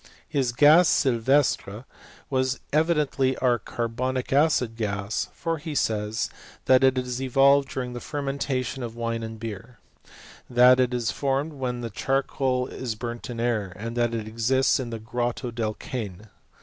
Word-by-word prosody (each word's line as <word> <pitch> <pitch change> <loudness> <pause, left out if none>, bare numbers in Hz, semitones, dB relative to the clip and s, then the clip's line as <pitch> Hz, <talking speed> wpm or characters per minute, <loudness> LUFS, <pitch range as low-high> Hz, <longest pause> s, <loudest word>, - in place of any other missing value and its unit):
His 130 -4 0
gas 150 +7 +6
sylvestre 125 -3 +1 0.4
was 130 -1 0
evidently*, 150 -4 +2
our 120 -2 +2
carbonic 125 +4 -3
acid 140 -6 +2
gas, 100 -2 -2
for 165 -1 -3
he 150 0 -6
says, 110 -2 0 0.4
that 130 0 +5
it 130 -1 +4
is 125 -1 -2
evolvedf 135 +1 +4
during 125 -2 -4
the 120 - -5
fermentation 135 -2 -3
of 115 -2 -5
wine 115 -1 -2
and 110 -1 -7
beer; 115 +2 -7 0.7
that 125 +1 +6
it 125 -1 +3
flp 120 -3 -1
formed 140 +3 -1
when 125 -3 -3
charcoal 135 0 0
is 120 -3 -5
burnt 120 +3 -6
in 120 -1 -5
air; 110 -6 -1
and 115 +4 -6
that 120 -1 +1
it 110 -2 -4
exiate 120 +5 +2
in 125 -2 -4
the 115 - -4
Grotto 120 +2 -3
del 110 -2 -2
Cane. 105 -4 -6
125 Hz, 150 wpm, -25 LUFS, 115-135 Hz, 0.7 s, gas